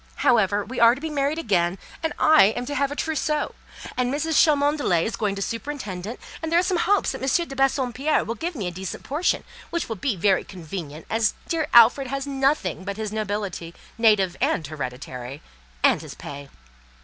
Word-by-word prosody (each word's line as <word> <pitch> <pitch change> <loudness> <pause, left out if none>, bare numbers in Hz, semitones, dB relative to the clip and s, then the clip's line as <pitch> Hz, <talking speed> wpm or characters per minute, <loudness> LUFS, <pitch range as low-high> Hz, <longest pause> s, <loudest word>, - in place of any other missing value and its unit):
However, 205 -4 +3
we 255 - -5
are 235 +1 +7
to - - -9
be 320 0 -4
married 285 +1 0
again, 185 - +1 0.2
and 320 -1 -1
I 310 -8 +6
am 245 - -3
to 285 - -4
have 280 -1 0
a - - -4
trousseau, 305 -1 -1 0.4
and 250 0 0
Mrs. 305 +3 -1
Cholmondeley 290 - +2
is 225 - -2
going 205 -3 -1
to 195 - -2
superintend 225 -7 -5
it; 235 - -6 0.2
and 320 0 -3
there 335 - +4
are 350 - +4
some 365 -1 +1
hopes 405 +3 +2
that 265 - -7
M. 305 +6 +1
de 270 - -8
Bassompierre 270 +1 +1
will 230 - -3
give 330 +7 -4
me 210 -8 -3
a 180 - -2
decent 185 +1 -6
portion, 305 +6 0 0.3
which 340 - -2
will 225 - -3
be 225 +3 -1
very 190 +2 +2
convenient, 160 -4 -8
as 225 -1 +1
dear 320 -3 -1
Alfred 240 +3 +7
has 275 +1 -3
nothing 270 - 0
but 200 +1 -5
his 215 -1 -3
nobility, 205 -5 -3 0.2
native 205 -6 +4
and 160 - +1
hereditary, 130 -2 -6 0.4
and - - +4
his - - -9
pay. 140 0 -9
235 Hz, 195 wpm, -24 LUFS, 190-290 Hz, 0.4 s, are